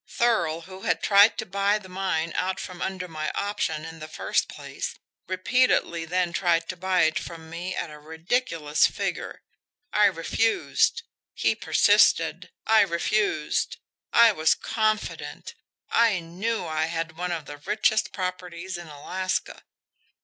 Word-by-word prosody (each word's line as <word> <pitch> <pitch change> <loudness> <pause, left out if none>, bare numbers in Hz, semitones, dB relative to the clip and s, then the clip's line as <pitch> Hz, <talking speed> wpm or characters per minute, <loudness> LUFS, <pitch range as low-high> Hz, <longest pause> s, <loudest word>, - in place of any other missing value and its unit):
Thurl, 170 -9 +1
who 185 +2 -11
had 165 -3 0
tried 205 +2 +6
to 220 - -3
buy 200 +1 +1
the 210 -3 -11
mine 180 -3 -2
out 185 +1 -1
from 180 -1 -7
under 190 -1 -3
my 155 -2 -3
option 180 -6 -2
in 165 0 -9
the 155 - -7
first 155 - -1
place, - - -6 0.3
repeatedly 185 -3 +1
then 175 +1 0
tried 170 -2 +1
to 185 - -3
buy 185 +1 +1
it 160 0 +2
from 160 -1 -9
me 175 +3 -4
at 160 - -4
a 150 - -11
ridiculous 160 0 0
figure. - - -4 0.5
I 210 - +5
refused. 225 - +1 0.3
He - - +2
persisted. - - +3 0.2
I 220 -1 +6
refused 185 -3 0 0.3
I 235 -1 +7
was 160 -5 +3
confident, 215 -1 -2 0.4
I 230 -5 +4
KNEW 185 +7 -3
I 155 -1 0
had 165 -1 -4
one 180 +1 -3
of 165 -4 -3
the 145 - -8
richest 215 +7 +1
properties 180 -1 -5
in 175 - -10
Alaska." 185 +6 -4
180 Hz, 145 wpm, -26 LUFS, 165-200 Hz, 0.5 s, I